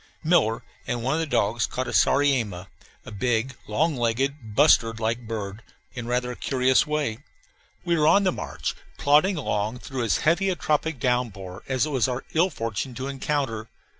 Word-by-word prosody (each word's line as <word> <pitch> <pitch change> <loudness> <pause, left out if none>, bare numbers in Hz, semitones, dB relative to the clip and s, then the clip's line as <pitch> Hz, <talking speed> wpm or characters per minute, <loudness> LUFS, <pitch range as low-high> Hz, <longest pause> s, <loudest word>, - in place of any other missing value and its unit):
Miller 155 -9 +2 0.2
and 120 -1 -2
one 135 +3 +1
of 160 - 0
the 165 - -1
dogs 115 -3 +1
caught 130 0 -3
a - - -4
sariema, 120 -10 +2 0.4
a - - -9
big, 120 +4 -1
long 150 +9 +1
legged, 120 -1 -1
bustard 115 -6 +4
like 115 +1 -2
bird, 105 -1 -5 0.3
in 120 -2 -6
rather 125 0 0
a - - -6
curious 130 +2 +2
way. 150 -7 -1 0.7
We 170 -1 +2
were 155 -2 +3
on 200 +5 +5
the 185 - +3
march, - - -4 0.2
plodding 155 +7 +4
along 110 -4 -1
through 130 0 -4
as 115 - +2
heavy 175 +5 +3
a 185 - 0
tropic 155 -2 -1
downpour 110 -8 -2
as 130 +1 +1
it - - -4
was 130 -4 +2
our 125 0 -3
ill 170 +4 +3
fortune 115 - -4
to 130 +2 -4
encounter. 135 -5 -2
125 Hz, 180 wpm, -25 LUFS, 115-150 Hz, 0.7 s, on